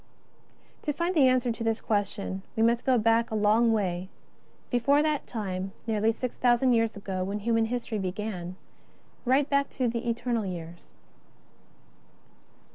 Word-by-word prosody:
To 295 - -1
find 340 +5 -1
the 290 -6 +5
answer 255 -1 +2
to 230 0 -5
this 225 -1 0
question, 200 -2 -2
we 225 - +2
must 235 +1 +2
go 255 -1 +5
back 230 +1 +3
a 220 - -3
long 215 +2 +4
way 190 -4 -1 0.3
— - - -34
before 275 +4 +3
that 305 -2 -1
time, 195 -4 -4
nearly 220 -1 +2
six 245 +2 -4
thousand 245 +1 +3
years 225 -2 +1
ago, 190 -2 -3
when 200 +2 -3
human 225 +1 +2
history 235 -2 -3
began 185 -2 -4 0.4
— - - -33
right 280 +1 +3
back 280 -1 +1
to 255 -2 +1
the 235 +1 -2
Eternal 235 -2 -1
Years. 170 -1 -7
225 Hz, 160 wpm, -28 LUFS, 200-245 Hz, 0.4 s, the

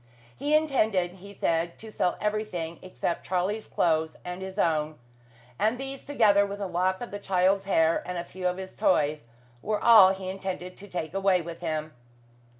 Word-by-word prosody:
He 290 +3 +1
intended, 220 - +2
he 200 +1 -10
said, 170 -3 -1
to 220 0 -10
sell 180 - 0
everything 210 -6 -3
except 180 -2 -4
Charlie's 190 +4 -1
clothes 160 -1 +1
and 180 +1 -5
his 190 +1 -7
own, 155 -4 +1 0.6
and 220 +3 +2
these, 270 +1 -7
together 215 -8 +4
with 200 0 -5
a 200 - -2
lock 185 +2 0
of 245 - -6
the 205 - -5
child's 195 0 +2
hair 165 -4 +3
and 180 0 -5
a 170 - -2
few 180 +1 -4
of 180 0 -1
his 190 0 -7
toys, 150 -5 +1 0.4
were 210 +6 -1
all 220 -5 +8
he 190 -1 -5
intended 185 -1 -5
to 205 - -11
take 175 -4 -4
away 195 -1 +3
with 170 0 -7
him. 155 -2 -3
185 Hz, 180 wpm, -27 LUFS, 170-205 Hz, 0.6 s, all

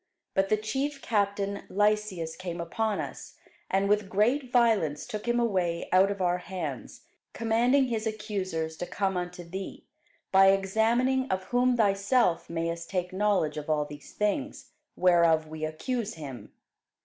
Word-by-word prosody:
But 195 0 +1
the 215 - +3
chief 270 +7 -2
captain 200 -2 0
Lysias 205 -5 0
came 180 -2 -6
upon 210 +5 -1
us, - - -7 0.3
and 195 +1 +2
with 205 -1 +1
great 245 +7 +1
violence 220 - +2
took 215 +2 -6
him 240 0 +2
away 185 -7 0
out 185 +2 +5
of 200 -2 -2
our 180 0 +1
hands, 165 -9 -6 0.3
commanding 240 +4 +3
his 225 -3 -2
accusers 190 -7 -3
to 175 - -4
come 195 -2 -1
unto 180 0 -4
thee: 190 +3 -7 0.5
by 195 0 +7
examining 230 +7 +2
of 190 0 -1
whom 245 +4 +2
thyself 200 -3 +2
mayest 165 0 -3
take 180 -1 -2
knowledge 195 -6 +1
of 150 +1 -6
all 150 -1 +1
these 145 0 -11
things, 210 +8 -2 0.2
whereof 170 -3 +4
we 155 0 -7
accuse 215 +8 -3
him. 135 -9 -9
195 Hz, 150 wpm, -28 LUFS, 170-220 Hz, 0.5 s, by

